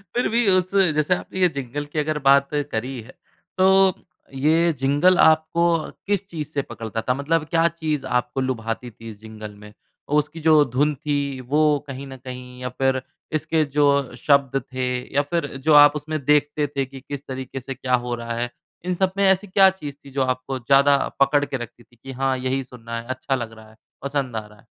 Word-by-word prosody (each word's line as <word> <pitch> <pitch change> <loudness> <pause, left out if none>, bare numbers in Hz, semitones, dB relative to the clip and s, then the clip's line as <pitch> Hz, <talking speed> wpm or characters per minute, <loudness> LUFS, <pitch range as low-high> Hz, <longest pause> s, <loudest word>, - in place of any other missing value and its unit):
फिर 245 - +2
भी 230 -1 +2
उस 185 0 +2 0.2
जैसे 150 +4 +2
आपने 190 - -7
ये 180 - +5
जिंगल 140 +3 -4
की 150 +1 -4
अगर 150 0 -1
बात 140 0 +5 0.2
करी 125 +3 -3
है, 125 +5 -13 0.5
तो 190 0 +5 0.4
ये 160 +5 +2
जिंगल 145 +7 +3
आपको 160 +2 +4 0.4
किस 205 -1 0
चीज़ 155 -5 -6
से 140 - -1
पकड़ता 115 -3 -6
था? 125 - 0
मतलब 155 +3 0
क्या 165 0 +3
चीज़ 155 -4 -3
आपको 125 +1 -1
लुभाती 120 -1 -3
थी 115 +1 -11
इस 105 -2 -11
जिंगल 110 -1 -9
में? 105 0 -14 0.3
उसकी 150 +2 0
जो 155 -1 +5
धुन 150 +3 +2
थी 145 +2 -2 0.4
वो 150 - +3 0.3
कहीं 135 0 -7
न 135 -1 -9
कहीं 125 -1 -9
या 125 - -3
फिर 130 +1 0 0.3
इसके 155 +1 +1
जो 150 -1 +4 0.3
शब्द 135 0 +2
थे 130 0 -1 0.3
या 145 - +5
फिर 170 -1 0 0.2
जो 155 - +6
आप 145 0 +8
उसमें 155 +1 -3
देखते 150 0 +2
थे 135 -1 0
कि 135 0 -12
किस 140 0 -7
तरीके 130 0 -6
से 135 +2 -6
क्या 125 -1 +1
हो 120 0 -2
रहा 115 0 -5
है? 120 0 -1 0.4
इन 180 -1 -1
सब 190 +1 +1
में 200 - +2
ऐसी 190 +1 +3
क्या 190 +1 +6
चीज़ 150 -7 -7
थी - - -10
जो 135 - +3
आपको 130 +1 -2
ज़्यादा 140 +3 +4 0.2
पकड़ 145 +1 +3
के 135 - -3
रखती 120 0 -9
थी 120 - -27
कि 135 - -7
हाँ, 130 0 0
यही 130 +1 -1
सुनना 115 -2 -8
है 115 - -10
अच्छा 130 +1 -2
लग 115 -3 -5
रहा 110 -1 -15
है, 110 - -21 0.3
पसंद 140 -4 -2
आ 110 -1 -3
रहा 105 -1 -19
है। - - -23
140 Hz, 210 wpm, -22 LUFS, 125-155 Hz, 0.5 s, आप